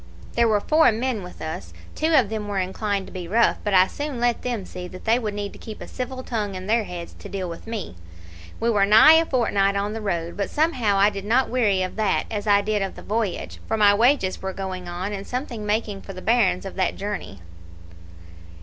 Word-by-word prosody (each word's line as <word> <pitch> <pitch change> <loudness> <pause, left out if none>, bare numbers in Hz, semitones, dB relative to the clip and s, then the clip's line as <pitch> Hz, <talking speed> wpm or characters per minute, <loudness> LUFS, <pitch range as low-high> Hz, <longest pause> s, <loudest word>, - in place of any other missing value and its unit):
There 235 0 +3
were 215 -2 +3
four 310 +7 +4
men 230 0 -2
with 180 -1 -9
us; 90 - -6 0.2
two 320 +1 0
of 245 -9 +4
them 215 -1 -4
were 205 -1 -3
inclined 195 +1 -1
to - - -13
be 180 -2 -6
rough; 230 +6 +3
but 205 -2 +1
I 185 0 +7
soon 285 +4 -5
let 240 0 +1
them 235 -6 -3
see 180 0 -7
that 185 +1 -11
they 230 +2 +3
would 210 -4 -3
need 205 -1 -4
to - - -13
keep 220 -2 -9
a - - -8
civil 255 0 -5
tongue 210 -6 -3
in 185 0 -6
their 220 +1 +1
heads 175 -2 -7
to - - -9
deal 190 -2 -3
with 170 +5 -8
me. 215 - -5 0.6
We 235 +1 +1
were 205 -3 +3
nigh 220 +9 +8
a 330 - -3
fortnight 200 -6 +1
on 200 +1 -1
the 225 - -5
road, 170 -4 -2
but 200 - -2
somehow 255 -10 +1
I 200 +2 +5
did 200 -1 -6
not 245 +4 +2
weary 210 -7 +2
of 185 - -5
that 215 -3 +1
as 210 -1 -3
I 205 -1 +5
did 210 0 -1
of 195 - -3
the - - -10
voyage, 215 -3 -2
for 220 - 0
my 205 -1 +6
wages 230 -3 +2
were 190 0 -3
going 185 -2 -5
on, 185 +4 -4
and 200 0 -6
something 245 -4 -4
making 210 -2 -1
for 195 - -9
the 185 - -8
bairns 215 -5 +2
of 195 - -6
that 185 -2 +1
journey." 195 - -5
205 Hz, 235 wpm, -23 LUFS, 190-230 Hz, 0.6 s, nigh